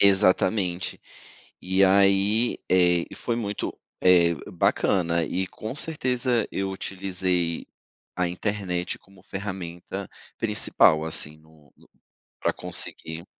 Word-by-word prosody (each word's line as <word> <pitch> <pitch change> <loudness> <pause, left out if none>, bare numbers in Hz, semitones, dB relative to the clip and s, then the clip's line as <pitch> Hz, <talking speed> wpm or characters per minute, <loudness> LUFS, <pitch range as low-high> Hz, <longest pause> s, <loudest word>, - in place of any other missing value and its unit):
Exatamente. 95 -2 +2 0.6
E 95 +1 +3
aí, 100 +4 +3
eh, 90 -2 +4
foi 120 -1 -2
muito, 105 -3 -3 0.2
eh, 85 -2 +5 0.2
bacana 85 -1 +1
e 95 +3 -2
com 110 +6 -7
certeza 125 -7 0
eu 95 0 -2
utilizei 90 -3 -2 0.5
a 90 -1 +1
internet 90 -1 -2
como 95 -1 -21
ferramenta 95 -4 -6 0.3
principal, 105 -6 +3
assim, 75 -1 +1
no 80 -3 -23
no - - -23 0.5
pra - - +1
conseguir. 80 +2 -2
95 Hz, 105 wpm, -25 LUFS, 85-100 Hz, 0.6 s, eh